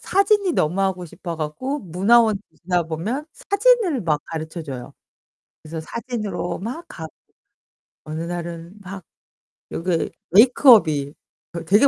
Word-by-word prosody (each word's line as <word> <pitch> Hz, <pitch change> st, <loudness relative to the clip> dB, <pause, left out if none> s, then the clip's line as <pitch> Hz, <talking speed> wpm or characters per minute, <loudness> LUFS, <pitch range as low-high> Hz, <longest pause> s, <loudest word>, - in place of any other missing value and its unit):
사진이 395 Hz, -1 st, +2 dB
너무 175 Hz, -, +1 dB
하고 190 Hz, -2 st, 0 dB
싶어 170 Hz, 0 st, -7 dB
갖고 255 Hz, -, -3 dB
문화원 210 Hz, +5 st, +4 dB, 0.3 s
지나 175 Hz, -1 st, +1 dB
보면 210 Hz, -, -3 dB, 0.2 s
사진을 400 Hz, -, +4 dB
막 150 Hz, -3 st, 0 dB
가르쳐 160 Hz, +1 st, -5 dB
줘요. 130 Hz, -5 st, -7 dB, 0.7 s
그래서 160 Hz, +1 st, -6 dB
사진으로 210 Hz, -4 st, -4 dB
막 255 Hz, -, -5 dB
가고. 160 Hz, -1 st, -8 dB, 0.9 s
어느 155 Hz, +1 st, -4 dB
날은 170 Hz, +1 st, -6 dB
막 190 Hz, -2 st, -8 dB, 0.7 s
여기 170 Hz, -1 st, -1 dB, 0.2 s
메이크업이 195 Hz, -, +6 dB, 0.4 s
그 170 Hz, -1 st, -5 dB
되게 205 Hz, -, +6 dB
180 Hz, 265 characters per minute, -22 LUFS, 160-240 Hz, 0.9 s, 메이크업이